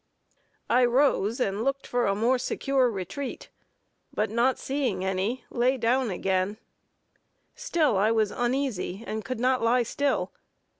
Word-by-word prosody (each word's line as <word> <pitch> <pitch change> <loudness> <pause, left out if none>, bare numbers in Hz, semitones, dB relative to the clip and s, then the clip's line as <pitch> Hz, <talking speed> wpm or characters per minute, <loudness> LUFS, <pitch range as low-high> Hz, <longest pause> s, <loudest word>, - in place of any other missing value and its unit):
I 250 +2 +4
rose 240 -3 +2
and 200 -2 -1
looked 275 +1 -1
for 245 -2 0
a 195 - +1
more 240 +5 +2
secure 265 0 +1
retreat, 200 +6 -6 0.6
but 210 0 -1
not 240 +3 +2
seeing 255 -9 -2
any, 190 +7 -2
lay 255 +2 +2
down 245 +1 +1
again 190 +2 -1 1.0
still 335 - +1
I 205 +3 +3
was 220 -2 +2
uneasy, 240 -5 -2
and 215 0 -4
could 255 -3 -4
not 255 +1 +2
lie 240 +2 +3
still. 280 +5 -1
240 Hz, 140 wpm, -27 LUFS, 210-260 Hz, 1.0 s, I